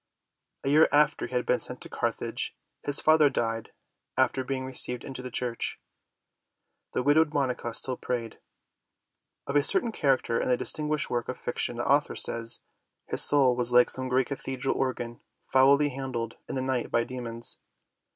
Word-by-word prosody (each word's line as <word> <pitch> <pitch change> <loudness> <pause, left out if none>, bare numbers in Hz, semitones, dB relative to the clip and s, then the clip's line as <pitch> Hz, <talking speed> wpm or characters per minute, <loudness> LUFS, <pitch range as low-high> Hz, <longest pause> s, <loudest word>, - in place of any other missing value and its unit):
A 135 - -1
year 155 +3 +5
after 150 +1 +2
he 130 - -7
had 125 - 0
been 125 - +2
sent - - -4
to - - -5
Carthage, - - -3 0.3
his 145 0 +1
father 155 -2 +5
died 115 -3 -3 0.5
after 130 - +2
being 130 0 -3
received 125 -1 +2
into 130 -2 -7
the 125 - -7
Church. 120 -1 -3 1.1
The 125 - 0
widowed 150 +2 +3
Monica 125 -4 -1
still 130 -1 -1
prayed. 115 -3 -4 1.1
Of 140 - -4
a 145 - +6
certain 235 - +4
character 135 - +1
in - - -1
a 125 - +3
distinguished 150 +2 -2
work 120 -1 -2
of - - -4
fiction - - -2
the - - -2
author - - +2
says: 115 0 0 0.5
"His - - +3
soul 135 -4 +4
was 125 0 +2
like 125 0 +6
some 130 0 0
great 130 0 +2
cathedral 135 -1 -3
organ 120 -3 -3 0.2
foully 140 +2 +4
handled 125 -4 -5
in - - -4
the 130 - -2
night 130 -2 -1
by 115 - +1
demons." 120 -2 -5
130 Hz, 170 wpm, -27 LUFS, 120-140 Hz, 1.1 s, a